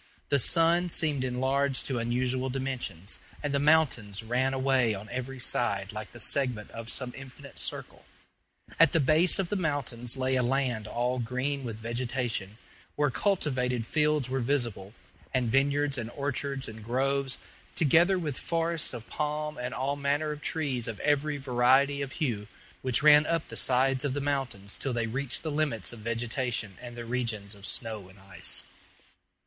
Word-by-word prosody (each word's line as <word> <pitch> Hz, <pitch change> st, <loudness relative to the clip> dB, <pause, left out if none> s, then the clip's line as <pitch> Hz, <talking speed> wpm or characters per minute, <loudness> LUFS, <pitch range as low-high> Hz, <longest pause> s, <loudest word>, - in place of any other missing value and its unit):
The 140 Hz, -, +3 dB
sun 170 Hz, +6 st, +3 dB
seemed 150 Hz, -5 st, +1 dB
enlarged 130 Hz, +1 st, 0 dB
to 130 Hz, -3 st, -1 dB
unusual 125 Hz, +2 st, 0 dB
dimensions, 125 Hz, -8 st, -2 dB, 0.2 s
and 145 Hz, -1 st, -1 dB
the 140 Hz, -, +2 dB
mountains 135 Hz, -9 st, +2 dB
ran 125 Hz, +4 st, +1 dB
away 130 Hz, -4 st, +2 dB
on 100 Hz, +2 st, -8 dB
every 130 Hz, +2 st, -4 dB
side 100 Hz, -5 st, 0 dB
like 105 Hz, 0 st, -6 dB
the 120 Hz, -, -11 dB
segment 125 Hz, -4 st, +3 dB
of 115 Hz, 0 st, -7 dB
some 125 Hz, 0 st, -1 dB
infinite 135 Hz, +1 st, -9 dB
circle. -, -, -4 dB, 0.8 s
At 165 Hz, -1 st, +6 dB
the 165 Hz, -, +4 dB
base 155 Hz, +5 st, +4 dB
of 190 Hz, -3 st, 0 dB
the -, -, -1 dB
mountains 140 Hz, -, -2 dB
lay 130 Hz, 0 st, +1 dB
a 130 Hz, -, +3 dB
land 125 Hz, -3 st, 0 dB
all 125 Hz, +3 st, -1 dB
green 130 Hz, +4 st, -2 dB
with 115 Hz, -3 st, -4 dB
vegetation, 115 Hz, -3 st, -3 dB, 0.4 s
where 145 Hz, -1 st, +2 dB
cultivated 125 Hz, -, 0 dB
fields 150 Hz, -1 st, +1 dB
were 130 Hz, +1 st, -1 dB
visible, 120 Hz, -6 st, -1 dB, 0.4 s
and 125 Hz, -3 st, +1 dB
vineyards 140 Hz, +1 st, +2 dB
and 115 Hz, -1 st, -4 dB
orchards 140 Hz, -1 st, -2 dB
and 110 Hz, -1 st, -9 dB
groves, 135 Hz, +3 st, 0 dB, 0.4 s
together 170 Hz, +5 st, +4 dB
with 150 Hz, -7 st, -3 dB
forests 165 Hz, -4 st, 0 dB
of 115 Hz, -2 st, -8 dB
palm 150 Hz, -1 st, -3 dB
and 125 Hz, +1 st, -3 dB
all 135 Hz, +2 st, -1 dB
manner 145 Hz, +2 st, 0 dB
of 150 Hz, 0 st, -6 dB
trees 140 Hz, -8 st, -1 dB
of 110 Hz, -3 st, -5 dB
every 145 Hz, 0 st, +1 dB
variety 135 Hz, +2 st, +3 dB
of 140 Hz, -1 st, -4 dB
hue, 115 Hz, -10 st, -2 dB, 0.3 s
which 130 Hz, 0 st, +2 dB
ran 150 Hz, 0 st, +7 dB
up 165 Hz, -1 st, -1 dB
the -, -, -7 dB
sides 130 Hz, +1 st, +3 dB
of 140 Hz, -2 st, -1 dB
the -, -, 0 dB
mountains 135 Hz, -8 st, -3 dB
till 135 Hz, -, -2 dB
they 120 Hz, -1 st, 0 dB
reached 125 Hz, +3 st, -2 dB
the 160 Hz, -, -2 dB
limits 145 Hz, -9 st, -1 dB
of 120 Hz, -, -10 dB
vegetation 115 Hz, -1 st, -2 dB
and 120 Hz, -1 st, -7 dB
the 120 Hz, -1 st, -6 dB
regions 115 Hz, -4 st, -2 dB
of 100 Hz, -1 st, -6 dB
snow 110 Hz, -3 st, 0 dB
and 95 Hz, -, -16 dB
ice. 95 Hz, -1 st, -2 dB
130 Hz, 170 wpm, -29 LUFS, 120-145 Hz, 0.8 s, ran